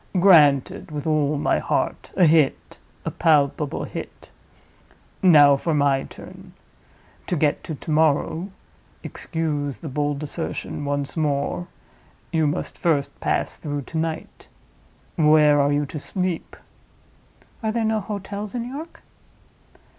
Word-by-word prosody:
"Granted 160 Hz, -2 st, +5 dB
with 150 Hz, -2 st, -5 dB
all 150 Hz, -2 st, +1 dB
my -, -, +1 dB
heart—a 185 Hz, -, 0 dB
hit, 155 Hz, -3 st, +2 dB, 0.3 s
a -, -, -2 dB
palpable 150 Hz, -2 st, +1 dB
hit. -, -, -8 dB, 0.9 s
Now 145 Hz, -6 st, +7 dB
for 160 Hz, +2 st, -1 dB
my 140 Hz, -2 st, +2 dB
turn. -, -, -13 dB, 0.7 s
To -, -, 0 dB
get 150 Hz, -2 st, +1 dB
to 160 Hz, -, -4 dB
to 155 Hz, -, -7 dB
morrow 160 Hz, +4 st, +1 dB, 0.5 s
(excuse 150 Hz, -4 st, -3 dB
the 160 Hz, -, -7 dB
bold 145 Hz, +1 st, -2 dB
assertion, 150 Hz, -1 st, -5 dB
once 140 Hz, -1 st, -2 dB
more), 150 Hz, +2 st, -1 dB, 0.7 s
you 160 Hz, -2 st, +2 dB
must 150 Hz, +5 st, -3 dB
first 150 Hz, -5 st, 0 dB
pass -, -, -1 dB
through 145 Hz, -2 st, -4 dB
to 160 Hz, -, -4 dB
night. 160 Hz, 0 st, -5 dB, 0.7 s
Where 150 Hz, -2 st, +5 dB
are 140 Hz, +1 st, +2 dB
you 145 Hz, 0 st, +1 dB
to 150 Hz, +2 st, -6 dB
sleep?" 180 Hz, +2 st, -3 dB, 1.1 s
"Are 220 Hz, -1 st, -1 dB
there 225 Hz, 0 st, -1 dB
no 220 Hz, 0 st, +1 dB
hotels 205 Hz, +1 st, -6 dB
in 240 Hz, 0 st, -3 dB
York?" 300 Hz, +6 st, -9 dB
155 Hz, 125 wpm, -23 LUFS, 145-175 Hz, 1.1 s, Now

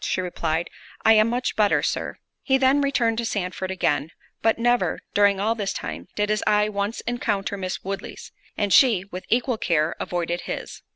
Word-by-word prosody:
She -, -, -1 dB
replied, 170 Hz, -2 st, -2 dB, 0.3 s
"I 220 Hz, -, +8 dB
am 215 Hz, +1 st, +5 dB
much 245 Hz, +2 st, -1 dB
better, 210 Hz, -2 st, +3 dB
Sir." -, -, -2 dB, 0.2 s
He 265 Hz, -1 st, +2 dB
then 270 Hz, +2 st, +3 dB
returned 235 Hz, -5 st, +1 dB
to -, -, -1 dB
Sandford 190 Hz, -4 st, -3 dB
again; 150 Hz, -5 st, 0 dB, 0.3 s
but 225 Hz, -, +2 dB
never, 240 Hz, +1 st, +1 dB
during 200 Hz, -1 st, +4 dB
all 215 Hz, +3 st, +1 dB
this 205 Hz, -4 st, -3 dB
time, 80 Hz, +1 st, -6 dB
did 210 Hz, 0 st, 0 dB
his 215 Hz, 0 st, +1 dB
eye 210 Hz, 0 st, +3 dB
once 200 Hz, +2 st, -2 dB
encounter 210 Hz, -5 st, -2 dB
Miss 185 Hz, -1 st, -4 dB
Woodley's; 195 Hz, 0 st, -6 dB, 0.3 s
and 205 Hz, -2 st, +1 dB
she, 220 Hz, -9 st, +5 dB
with 185 Hz, +1 st, -7 dB
equal 240 Hz, -1 st, +1 dB
care, 160 Hz, -1 st, +1 dB
avoided 175 Hz, 0 st, -2 dB
his. -, -, -6 dB
205 Hz, 180 wpm, -24 LUFS, 185-230 Hz, 0.3 s, I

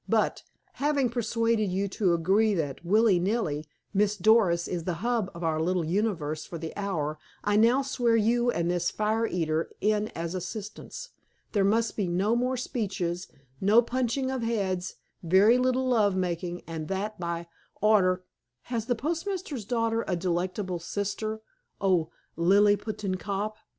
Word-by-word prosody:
But, -, -, +1 dB, 0.4 s
having 285 Hz, -3 st, +2 dB
persuaded 230 Hz, -2 st, +1 dB
you 195 Hz, +2 st, 0 dB
to 190 Hz, -2 st, +1 dB
agree 200 Hz, +6 st, +3 dB
that, 150 Hz, -3 st, -3 dB
willy 205 Hz, +1 st, +4 dB
nilly, 175 Hz, -6 st, -1 dB, 0.3 s
Miss 210 Hz, +1 st, +2 dB
Doris 195 Hz, -4 st, +4 dB
is 170 Hz, -3 st, -3 dB
the 180 Hz, -, -1 dB
hub 235 Hz, -5 st, +1 dB
of 170 Hz, -, -7 dB
our 160 Hz, -1 st, 0 dB
little 175 Hz, 0 st, 0 dB
universe 165 Hz, -5 st, -1 dB
for 170 Hz, -, -7 dB
the 160 Hz, 0 st, -6 dB
hour, 155 Hz, -7 st, -2 dB, 0.2 s
I 205 Hz, 0 st, +1 dB
now 235 Hz, +6 st, +4 dB
swear 245 Hz, -3 st, +1 dB
you 235 Hz, +2 st, +3 dB
and 170 Hz, -6 st, 0 dB
this 175 Hz, 0 st, +1 dB
fire 220 Hz, +2 st, 0 dB
eater 160 Hz, -3 st, -1 dB
in 210 Hz, 0 st, +1 dB
as 165 Hz, +1 st, -3 dB
assistants. 210 Hz, -, -6 dB, 0.4 s
There 205 Hz, -3 st, +2 dB
must 220 Hz, +3 st, +2 dB
be 200 Hz, -4 st, -1 dB
no 190 Hz, +6 st, +1 dB
more 250 Hz, +2 st, 0 dB
speeches, 190 Hz, -8 st, -3 dB, 0.3 s
no 215 Hz, +5 st, +5 dB
punching 255 Hz, +2 st, -1 dB
of 260 Hz, -2 st, -2 dB
heads, 195 Hz, -5 st, -1 dB, 0.3 s
very 195 Hz, +8 st, +5 dB
little 255 Hz, +1 st, +1 dB
love 215 Hz, -6 st, +3 dB
making, 175 Hz, -1 st, -2 dB
and 160 Hz, -2 st, -5 dB
that 200 Hz, +2 st, -3 dB
by 170 Hz, -1 st, -3 dB, 0.3 s
order—" 185 Hz, -4 st, +3 dB, 0.5 s
"Has 230 Hz, -1 st, -1 dB
the 245 Hz, -, +2 dB
postmaster's 330 Hz, -, -3 dB
daughter 230 Hz, 0 st, 0 dB
a 180 Hz, -, +1 dB
delectable 180 Hz, +1 st, -2 dB
sister, 205 Hz, +4 st, -3 dB, 0.4 s
O 180 Hz, -5 st, +2 dB, 0.3 s
Liliputian 200 Hz, +2 st, +2 dB
cop?" 205 Hz, +2 st, -3 dB
205 Hz, 150 wpm, -28 LUFS, 175-230 Hz, 0.5 s, no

